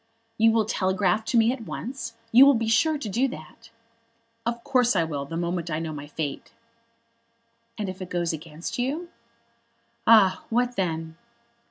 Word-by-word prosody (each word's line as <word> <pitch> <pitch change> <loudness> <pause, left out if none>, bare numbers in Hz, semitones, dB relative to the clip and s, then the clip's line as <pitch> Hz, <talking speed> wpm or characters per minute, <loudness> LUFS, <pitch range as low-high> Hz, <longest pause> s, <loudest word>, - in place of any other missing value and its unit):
"You 225 +1 +6
will 225 -1 +2
telegraph 190 0 0
to 240 - +1
me 230 +2 +4
at 260 - -8
once? 230 -2 -6 0.2
You 255 +4 +8
will 280 - +6
be 225 -1 -1
sure 300 +8 +3
to 275 - -6
do 235 +7 +1
that?" 225 +4 -11 0.8
"Of 235 0 -2
course 250 -4 +2
I 170 - +3
will, 145 -3 -4
the 165 +4 -5
moment 175 0 -2
I 155 - -1
know 160 -1 -4
my 145 -1 -7
fate." 145 -2 -5 1.3
"And 210 -3 -3
if 185 +1 -7
it 185 - -6
goes 175 -2 -1
against 160 +6 -6
you?" 300 +8 -2 1.0
"Ah, 205 -5 +6
what 245 +1 0
then?" 165 -4 -3
210 Hz, 170 wpm, -25 LUFS, 165-235 Hz, 1.3 s, You